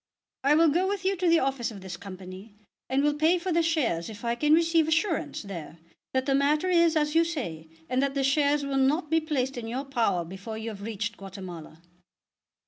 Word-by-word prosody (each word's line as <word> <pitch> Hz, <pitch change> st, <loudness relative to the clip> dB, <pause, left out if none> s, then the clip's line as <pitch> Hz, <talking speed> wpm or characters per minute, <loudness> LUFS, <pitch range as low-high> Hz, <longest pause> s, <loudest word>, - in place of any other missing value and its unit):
"I 285 Hz, +2 st, +5 dB
will 325 Hz, +1 st, +5 dB
go 350 Hz, +6 st, +1 dB
with 390 Hz, -1 st, -3 dB
you 390 Hz, +1 st, +2 dB
to 360 Hz, 0 st, 0 dB
the 335 Hz, 0 st, +6 dB
office 265 Hz, -5 st, 0 dB
of 205 Hz, -4 st, -10 dB
this 185 Hz, -2 st, -6 dB
Company, 190 Hz, +2 st, -10 dB, 0.3 s
and 270 Hz, +2 st, +2 dB
will 295 Hz, 0 st, +3 dB
pay 315 Hz, +4 st, +3 dB
for 360 Hz, +1 st, -3 dB
the 335 Hz, 0 st, +3 dB
shares 280 Hz, -, 0 dB
if 220 Hz, +2 st, -9 dB
I 235 Hz, -, +1 dB
can 300 Hz, +5 st, +4 dB
receive 330 Hz, -1 st, +3 dB
assurance 330 Hz, -, 0 dB
there 170 Hz, -5 st, -8 dB, 0.3 s
that 260 Hz, 0 st, 0 dB
the 275 Hz, -, +1 dB
matter 295 Hz, +5 st, +2 dB
is 335 Hz, -2 st, +4 dB
as 300 Hz, -1 st, +1 dB
you 330 Hz, +1 st, +5 dB
say, 175 Hz, -, -5 dB, 0.2 s
and 255 Hz, +1 st, +1 dB
that 275 Hz, 0 st, 0 dB
the 275 Hz, -, +1 dB
shares 285 Hz, +1 st, +2 dB
will 275 Hz, -1 st, -1 dB
not 295 Hz, +4 st, +1 dB
be 325 Hz, -, +4 dB
placed 270 Hz, -5 st, -2 dB
in 225 Hz, -, -6 dB
your 255 Hz, +5 st, -3 dB
power 225 Hz, -10 st, 0 dB
before 195 Hz, +5 st, -7 dB
you 220 Hz, +1 st, -4 dB
have 200 Hz, -2 st, -10 dB
reached 210 Hz, +1 st, -4 dB
Guatemala." 180 Hz, -4 st, -9 dB
275 Hz, 220 wpm, -27 LUFS, 205-315 Hz, 0.3 s, the